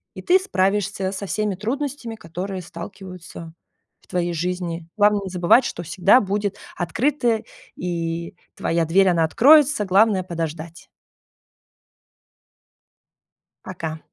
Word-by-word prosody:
и - - -7
ты 370 +2 +5
справишься 200 - 0
со 200 +1 -5
всеми 210 +1 -1
трудностями, 245 +3 -4
которые 185 +1 -6
сталкиваются 170 -1 -10 0.5
в - - -27
твоей 175 -1 -1
жизни. 170 -1 -3
Главное 205 0 +4
не 190 - -5
забывать, 180 +7 +4
что 175 - -4
всегда 180 +8 +4
будет 205 -1 -2 0.2
открыто, 235 - 0 0.3
и 170 +1 -4 0.2
твоя 165 0 0
дверь, 190 +4 +4
она 170 -2 +2
откроется. 280 - +5
Главное 195 0 +3
подождать. 165 -1 -6 2.8
Пока. 160 -3 -6
190 Hz, 110 wpm, -22 LUFS, 170-210 Hz, 2.8 s, ты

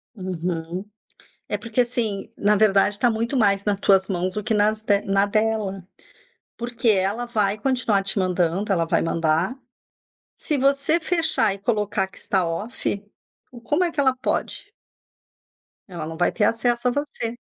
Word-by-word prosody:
Uhum. 180 -1 -4 0.6
É - - -2
porque, 230 +1 0
assim, 225 -5 -2
na 210 +1 +3
verdade, 200 -1 +3
tá 245 - +4
muito 230 +4 -1
mais 200 -3 +3
na 205 - +2
tuas 195 -1 +3
mãos 185 -1 -2
do 210 - -3
que 220 - 0
nas 215 +1 +2
de 205 -2 +2
na 195 0 +2
dela. 205 -3 -1 0.7
Porque 235 -1 -1
ela 200 +4 +1
vai 210 -3 0
continuar 230 -5 +1
te 195 +1 -1
mandando, 185 +2 0
ela 170 -3 +2
vai - - +1
mandar. 165 - 0 0.8
Se 300 -3 -1
você 275 +4 +2
fechar 320 - +2
e 200 - -9
colocar 210 -3 0
que 185 - -16
está 190 -3 0
off, 200 +3 -3 0.5
o 240 -2 -12
como 300 +9 +1
é 345 - 0
que 320 - -5
ela 265 -2 +3
pode? - - -2 1.2
Ela 170 -4 -6
não 160 0 -7
vai 175 - +2
ter 215 - -1
acesso 240 +2 +1
a - - +3
você. 240 -4 -3
210 Hz, 165 wpm, -23 LUFS, 190-240 Hz, 1.2 s, tá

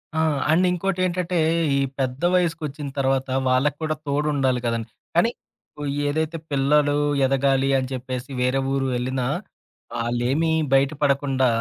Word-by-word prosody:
ఆ! - - +1 0.3
అండ్ 175 +4 +4
ఇంకోటి 185 +1 -1
ఏంటంటే, 180 0 -1 0.4
ఈ - - +2 0.2
పెద్ద 130 0 -2
వయసుకొచ్చిన 160 -5 -1
తర్వాత, 135 0 +1 0.2
వాళ్ళకి 135 +3 +2
కూడా 155 0 0
తోడుండాలి 140 -3 +1
కదండీ. 115 -1 -2 0.2
కానీ, 200 +8 +4 0.8
ఏదైతే 160 +2 -1
పిల్లలు 145 +1 +3 0.3
ఎదగాలి 135 0 +2
అని 130 -1 -3
చెప్పేసి, 130 +1 -5
వేరే 125 +2 +1
ఊరు 135 -1 0
ఎళ్ళినా? 130 0 -2 0.7
వాళ్ళేమీ 120 +7 0 0.2
బయట 135 0 +4
పడకుండా 135 -2 +2
135 Hz, 125 wpm, -23 LUFS, 130-155 Hz, 0.8 s, అండ్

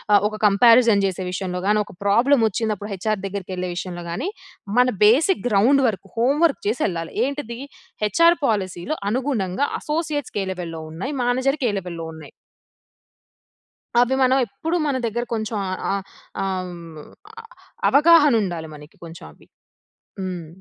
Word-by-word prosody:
ఆహ్, 205 - +7
ఒక 215 - -7
కంపారిజన్ 230 0 +5
చేసే 185 -1 -3
విషయంలో 180 -1 -3
గానీ, 210 +1 +3
ఒక - - -14
ప్రాబ్లమోచ్చినప్పుడు 220 -2 +2
హెచ్ఆర్ 210 +1 -2
దెగ్గరికెళ్ళే 185 -2 -4
విషయంలో 175 -1 -5
గానీ, 175 - -3 0.5
మన 250 - +6 0.2
basic 295 - +4
ground 245 +7 +4
work, 205 -4 -4
home 255 +6 +2
work 325 - +2
జేసెళ్ళాలి. 175 -7 -2
ఏంటిది, 270 -4 -5 0.5
హెచ్ఆర్ 335 - +4
పాలిసీలో 200 - -2
అనుగుణంగా, 245 -2 -1
అసోసియేట్స్‌కే 300 -9 -2
లెవెల్‌లో 165 -3 -6
ఉన్నాయి, 225 - -4
మేనేజర్‌కే 255 +1 +1
లెవెల్‌లో 170 -3 -7
ఉన్నాయి. 155 -2 -12 1.7
అవి 245 +2 +3
మనం 260 +1 +4
ఎప్పుడు 315 - -4
మన 275 - 0
దెగ్గర 235 +2 -2
కొంచెం 220 -1 -2
ఆహ్, 185 - -4
ఆహ్ 200 0 -2 0.4
ఆ! - - -1 0.2
హ్మ్. 170 -3 -10 0.4
ఆహ్, 455 - -12 0.4
అవగాహనుండాలి 260 - +4
మనకి 150 +1 -15
కొంచెం 165 0 -11
అవి. - - -22 0.7
హ్మ్. 180 -4 -5
215 Hz, 130 wpm, -22 LUFS, 185-265 Hz, 1.7 s, ఆహ్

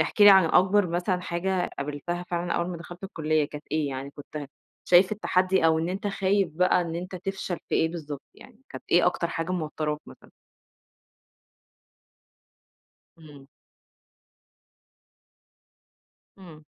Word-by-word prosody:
احكِ 165 +6 -1
لي 205 0 +10
عن 190 -2 +7
أكبر 190 +4 +4
مثلًا 180 +2 -1
حاجة 180 +1 -1
قابلتها 150 +5 -4
فعلًا 175 0 -1
أول 170 - -1
ما 180 - -4
دخلت 175 +3 -10
الكلِّية، 155 -5 0
كانت 150 +1 -9
إيه، 155 -2 0
يعني 135 +1 -5
كنت 145 0 -8 0.4
شايف 180 +3 +5
التحدي، 185 -3 +1
أو 160 0 +3
إن 165 +2 -1
أنت 195 +3 -3
خايف 195 -1 +1
بقى، 180 +2 +3
إن 165 -1 -4
أنت 180 +2 -6
تفشل 190 -1 -4
في - - -1
إيه 160 - +3
بالضبط 150 -4 -7
يعني، 235 -4 -16
كانت - - -9
إيه 175 +1 +5
أكتر 170 -1 0
حاجة 165 +3 -3
موتراك 155 -3 -2
مثلًا؟ - - -15 2.9
إمم. 145 -4 -15 2.9
إمم. 160 -5 -13
175 Hz, 135 wpm, -26 LUFS, 155-185 Hz, 2.9 s, لي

